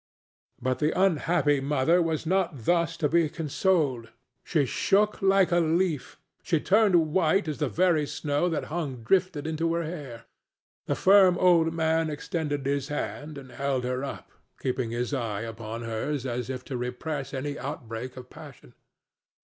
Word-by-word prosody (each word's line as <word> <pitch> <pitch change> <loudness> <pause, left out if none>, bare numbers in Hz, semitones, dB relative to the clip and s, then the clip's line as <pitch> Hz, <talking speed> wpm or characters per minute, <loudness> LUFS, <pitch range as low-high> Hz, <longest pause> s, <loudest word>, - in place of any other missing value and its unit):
But 130 +1 -1
the 155 +4 0
unhappy 160 -5 +2
mother 145 +5 +2
was 165 -1 -1
not 170 - 0
thus 170 -1 +1
to 155 - +1
be 165 0 +2
consoled. 150 -6 0 0.3
She 155 -5 +1
shook 210 - +1
like 195 -1 +4
a 175 - +4
leaf; 165 -2 0 0.2
she 165 - +1
turned 185 -5 +3
white 190 +1 +2
as 155 -1 -3
the 150 -4 0
very 165 -3 +2
snow 145 +3 -1
that 160 - -2
hung 140 -9 -3
drifted 180 +2 +1
into 165 +1 -1
her 170 - -1
hair. 145 -8 -7 0.6
The - - 0
firm 190 -2 +6
old 170 -3 +4
man 160 0 +1
extended 150 -2 -3
his 140 -1 -1
hand 150 0 -5
and 130 -2 -10
held 135 0 -1
her 125 +1 -2
up, 140 - -7 0.3
keeping 125 -2 -2
his 120 +4 -3
eye 115 -6 -2
upon 115 0 -6
hers 120 +5 -3
as 125 -1 -3
if 130 -1 -5
to 130 - -4
repress 125 +4 -4
any 145 +1 -4
outbreak 125 -2 -6
of 125 -1 -9
passion. 145 - -13
150 Hz, 160 wpm, -27 LUFS, 130-170 Hz, 0.6 s, firm